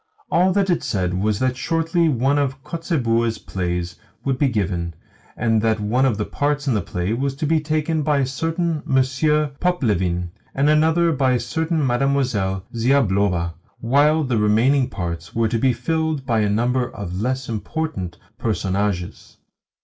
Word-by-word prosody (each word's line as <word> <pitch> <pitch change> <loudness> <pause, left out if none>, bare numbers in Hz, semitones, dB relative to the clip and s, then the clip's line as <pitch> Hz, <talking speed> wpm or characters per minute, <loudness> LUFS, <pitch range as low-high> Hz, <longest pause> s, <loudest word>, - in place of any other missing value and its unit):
All 180 +2 +4
that 195 -1 +2
it 175 - +1
said 90 -3 -1
was 100 +3 0
that 130 +2 0
shortly 165 +3 +1
one 135 +2 +2
of 135 -1 -2
Kotzebue's 115 - 0
plays 90 -3 -3 0.3
would 135 -2 0
be 140 - +3
given, 90 -7 -2 0.4
and 115 -1 +2
that 110 0 +1
one 120 +6 +2
of 115 -6 0
the 105 - -1
parts 145 0 -1
in 130 - +3
the 105 - +1
play 90 +1 -2
was 135 +3 -1
to 145 - -3
be 160 +1 +3
taken 155 +1 -1
by 150 0 +1
a 135 - +2
certain 165 +4 -1
Monsieur 140 +3 +1
Poplevin, 95 - 0 0.2
and 140 +2 +3
another 160 +2 +3
by 135 -4 +2
a 125 - +1
certain 160 +5 -1
Mademoiselle 120 -8 0
Ziablova, 100 -9 +1 0.3
while 145 +6 +3
the 125 -4 0
remaining 120 +6 +3
parts 85 -2 -5
were 115 0 +2
to 115 - 0
be 130 +2 +3
filled 160 +2 -1
by 115 -3 +1
a 105 -1 +2
number 120 +4 +1
of 95 -1 -5
less 130 +2 -1
important 110 - -4 0.2
personages. 100 -4 -2
130 Hz, 165 wpm, -21 LUFS, 105-150 Hz, 0.4 s, All